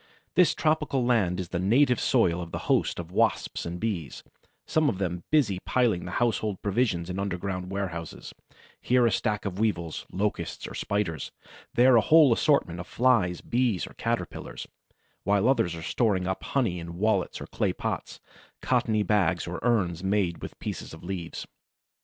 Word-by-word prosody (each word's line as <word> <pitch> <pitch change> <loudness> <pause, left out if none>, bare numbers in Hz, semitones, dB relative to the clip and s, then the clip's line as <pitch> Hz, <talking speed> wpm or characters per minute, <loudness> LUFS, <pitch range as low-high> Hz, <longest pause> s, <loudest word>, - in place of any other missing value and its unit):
This 180 -4 +4
tropical 150 -5 +1
land 105 -8 +2
is 90 -2 -4
the 90 - -2
native 125 +7 +3
soil 90 -9 +2
of 85 -1 -7
a - - -5
host - - +1
of 85 0 -7
Wasps 90 - 0
and 85 +1 -5
Bees, 90 - -3 0.4
some 155 -2 +2
of 100 - -2
them 90 -2 -3
busily 125 -12 +2
piling 115 -9 +1
the 90 - -6
household 110 -4 0
provisions 100 -5 0
in 90 +1 -4
underground 90 -1 -3
warehouses—here 100 +6 -3
a 115 - +3
stack 105 +2 -1
of 95 -1 -4
Weevils, 85 -7 -1
Locusts 105 +2 -2
or - - -8
Spiders, 100 -6 -2 0.4
there 125 +1 +6
a - - +6
whole 155 -1 +6
assortment 115 - +1
of 90 - -7
Flies, 115 -9 +2
Bees, 120 -6 0
or - - -12
Caterpillars,—while 100 +2 -3
others 90 -10 +2
are 80 - -7
storing 100 -1 +1
up 95 +1 -3
honey 115 -11 0
in 85 0 -8
wallets 110 +3 0
or - - -6
clay - - -1
pots, - - -4 0.4
cottony 110 -2 +1
bags 95 -4 +1
or 85 0 -5
urns 95 -8 +1
made 95 -3 0
with - - -8
pieces - - -6
of 80 - -15
leaves. 85 -2 -5
100 Hz, 165 wpm, -27 LUFS, 90-120 Hz, 0.4 s, there